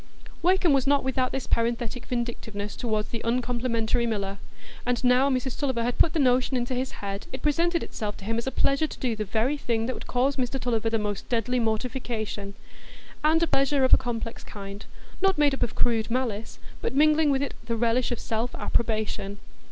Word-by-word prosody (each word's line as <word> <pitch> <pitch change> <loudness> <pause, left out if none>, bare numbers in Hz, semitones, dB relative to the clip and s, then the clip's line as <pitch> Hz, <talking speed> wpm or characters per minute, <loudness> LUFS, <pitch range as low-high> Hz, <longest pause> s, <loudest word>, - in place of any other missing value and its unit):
Wakem 360 -2 +4
was 275 -1 +2
not 285 0 +4
without 260 -1 0
this 270 - -3
parenthetic 235 +1 -1
vindictiveness 225 -4 -3
toward 215 -3 -1
the 230 - -3
uncomplimentary 235 -1 0
miller; 200 -3 -2 0.4
and 245 -1 0
now 250 +2 +5
Mrs 255 -1 -1
Tulliver 260 -5 0
had 245 +1 -2
put 320 - +5
the 325 - +1
notion 255 -1 +3
into 245 +1 -1
his 255 +1 -2
head, 200 0 -4
it 260 - -6
presented 335 +3 +2
itself 210 -2 -4
to 195 - -10
him 225 +2 0
as 235 - -5
a - - 0
pleasure 275 +4 +2
to - - -9
do 245 -4 0
the 215 0 -3
very 230 +8 +1
thing 230 -5 -1
that 255 - -1
would - - -9
cause 265 +3 +1
Mr 260 +1 -1
Tulliver 230 -2 0
the 225 - +1
most 210 -2 -3
deadly 245 +1 +1
mortification,—and 230 +6 -2
a - - +5
pleasure 275 -2 +2
of 260 - +4
a - - +11
complex 235 -2 -4
kind, 200 0 -8 0.3
not 385 -1 +3
made 295 -2 +4
up 270 - -4
of 240 - 0
crude 225 -2 +1
malice, 230 -3 -2 0.2
but - - -2
mingling 305 +1 +5
with 275 0 +2
it 280 - -3
the 230 0 -1
relish 235 +2 +1
of 240 - -1
self 225 +2 -2
approbation. 215 -3 -1
245 Hz, 200 wpm, -26 LUFS, 225-265 Hz, 0.4 s, a